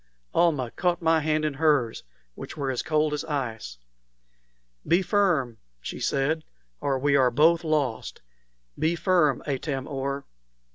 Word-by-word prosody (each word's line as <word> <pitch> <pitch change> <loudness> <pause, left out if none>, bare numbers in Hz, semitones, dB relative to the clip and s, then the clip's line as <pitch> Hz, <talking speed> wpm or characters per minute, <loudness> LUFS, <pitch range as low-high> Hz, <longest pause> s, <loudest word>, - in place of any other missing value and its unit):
Almah 145 -9 +2
caught 175 -2 0
my 165 -1 +3
hands 155 0 0
in 150 - -1
hers, 140 -6 +1 0.3
which - - -9
were 140 -2 -1
as 125 - -2
cold 155 -1 +1
as 150 - -2
ice. 120 - -4 1.1
"Be 175 +4 +3
firm," 170 - +1 0.2
she - - -7
said, 150 +4 0 0.4
"or 135 -2 0
we 140 +2 +2
are 130 -2 +5
both 160 +7 +3
lost. 145 - -2 0.6
Be 165 +2 +1
firm, 170 -5 +2
Atam 135 -1 -3
or!" 140 0 -3
150 Hz, 140 wpm, -26 LUFS, 135-160 Hz, 1.1 s, are